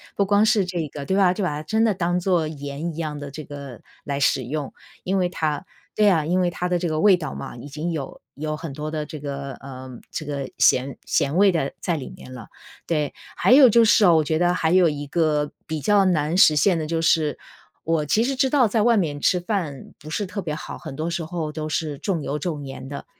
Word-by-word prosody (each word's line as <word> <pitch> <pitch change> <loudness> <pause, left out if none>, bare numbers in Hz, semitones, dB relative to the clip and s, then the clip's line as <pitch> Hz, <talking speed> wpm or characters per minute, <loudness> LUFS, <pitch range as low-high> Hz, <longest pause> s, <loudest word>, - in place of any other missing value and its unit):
不 200 - +2
光 205 +2 +4
是 215 -2 +3
这 175 -4 -3
个 140 0 -7
对 190 - 0
吧？ 185 -3 +4
就 200 - -3
把 180 - +1
它 150 +1 -4
真 220 +7 +1
的 220 -2 +3
当 175 -1 0
作 175 -3 +1
盐 145 +2 -5
一 - - -11
样 155 -3 -4
地 145 -1 -7
这 155 +2 -7
个 140 -5 -9 0.2
来 140 -1 -3
使 135 -1 +2
用， 140 +3 -4 0.3
因 190 +2 0
为 180 -1 +2
它 155 -3 -2 0.3
对 210 - +4
啊， 165 -5 +3
因 180 +4 +1
为 180 -1 +2
它 180 +1 -3
的 180 - +2
这 175 - -1
个 155 -1 -1
味 200 -3 +6
道 155 -5 -5
嘛， - - -7
已 120 - -9
经 155 +4 -4
有 150 -5 -5
有 155 +2 -3
很 160 -1 -7
多 150 +2 -5
的 155 -1 -3
这 155 - -8
个， 140 -1 -5
呃 130 -1 -10 0.2
这 155 - -5
个 140 -2 -4
咸 130 +2 +3
咸 140 +3 0
味 195 +1 +5
的 155 -6 -1
在 170 -2 -1
里 135 - -7
面 130 - -12
了， 120 -4 -9 0.4
对。 150 -4 -1 0.2
还 - - +2
有 265 0 +9
就 230 +1 +5
是 220 -1 +5
哦 175 -3 +6
我 155 - +3
觉 155 +1 0
得 175 0 +3
还 160 -2 0
有 180 -1 +5
一 145 -1 -3
个 150 -1 +1
比 155 -2 -4
较 205 +3 +4
难 165 -1 +1
实 155 -5 +7
现 170 +5 +3
的 155 - -3
就 165 0 -1
是， 160 -2 +2 0.5
我 160 -2 0
其 215 +10 +2
实 270 +2 -1
知 265 0 +2
道 265 -4 +4
在 215 +1 +1
外 235 0 +4
面 150 -7 -1
吃 180 - +3
饭 175 - -4
不 155 - -11
是 205 - -1
特 200 - -5
别 160 -4 -4
好， 150 - -7
很 - - -8
多 155 +3 -2
时 170 -1 -3
候 160 -2 -4
都 155 -1 -4
是 150 -2 -2
重 175 +1 -2
油、 145 +1 -3
重 150 -2 -4
盐 135 0 -8
的。 140 - -7
160 Hz, 270 characters per minute, -23 LUFS, 145-180 Hz, 0.5 s, 有